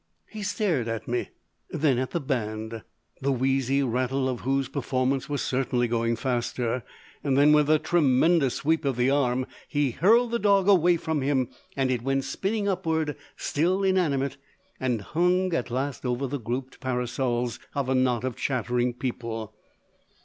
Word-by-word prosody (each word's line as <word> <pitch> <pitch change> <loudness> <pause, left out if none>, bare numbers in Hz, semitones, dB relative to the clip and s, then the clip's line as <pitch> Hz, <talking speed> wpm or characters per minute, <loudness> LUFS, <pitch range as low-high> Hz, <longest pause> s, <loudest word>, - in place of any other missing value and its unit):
He 215 - -7
stared 180 - 0
at 115 -1 -4
me. 120 0 -2 0.4
Then 140 -5 +1
at 130 - -1
the 170 - -1
band, 110 -4 -3 0.4
the 140 +1 +1
wheezy 135 +1 +1
rattle 130 +2 0
of 125 -2 -2
whose 135 +1 0
performance 130 0 -1
was 145 -1 -1
certainly 125 -2 0
going 115 0 0
faster. 120 0 -1 0.4
Then 145 +2 +4
with 150 -1 +4
a 155 - +6
tremendous 155 -2 +3
sweep 160 +2 +1
of 135 -3 0
the 125 +2 +3
arm 130 -2 +1 0.2
he 145 -3 +1
hurled 225 - +4
the 235 - 0
dog 200 -3 +3
away 175 -3 +5
from 160 -2 -2
him 130 -2 +1 0.3
and 135 -1 +1
it 125 -2 0
went 135 +2 0
spinning 200 +6 -2
upward, 160 -5 0 0.2
still 180 +6 0
inanimate, 145 -8 +1 0.4
and 125 -5 0
hung 180 - +1
at 125 -6 -1
last 130 +2 -3
over 125 +1 -1
the 140 +2 -3
grouped 125 +3 -4
parasols 125 -2 -1 0.2
of 140 -2 -1
a 130 - +1
knot 125 -2 +2
of 130 -2 -2
chattering 125 -2 -1
people. 115 -4 -4
135 Hz, 160 wpm, -26 LUFS, 125-155 Hz, 0.4 s, a